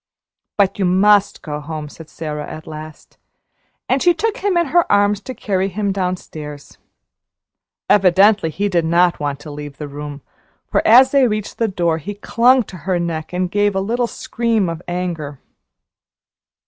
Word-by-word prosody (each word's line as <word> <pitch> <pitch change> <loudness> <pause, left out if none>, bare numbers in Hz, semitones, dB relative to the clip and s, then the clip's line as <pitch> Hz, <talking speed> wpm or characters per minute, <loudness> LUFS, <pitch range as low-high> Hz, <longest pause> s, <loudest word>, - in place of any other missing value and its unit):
"But 200 -1 +2
you 195 - +2
must 195 +3 +3
go 150 -2 -4
home," 150 0 -6
said 160 +2 -13
Sara 150 -2 -6
at 155 0 -9
last; 155 0 -11 0.7
and 260 +1 +1
she 350 -1 +4
took 440 +6 -1
him 390 -2 0
in 340 - +3
her 345 -1 +3
arms 205 0 +3
to 260 +4 -8
carry 190 -2 -1
him 200 +1 -2
downstairs. 160 -6 -5 1.1
Evidently 195 -1 +4
he 200 +6 -2
did 175 -4 +1
not 170 +2 +2
want 145 -1 -3
to 150 - -9
leave 145 -1 -8
the 150 - -6
room, 145 -1 -8 0.4
for - - +1
as 255 +4 +7
they 275 -3 +4
reached 215 -2 -4
the 230 - +2
door 170 -5 0
he 205 +6 -6
clung 245 +4 +3
to 190 - -11
her 185 - +2
neck 165 -2 -3
and 180 0 -2
gave 205 0 +1
a - - +1
little 235 +5 -1
scream 225 -5 -1
of 165 0 -5
anger. 170 -6 -4
185 Hz, 170 wpm, -19 LUFS, 155-210 Hz, 1.1 s, as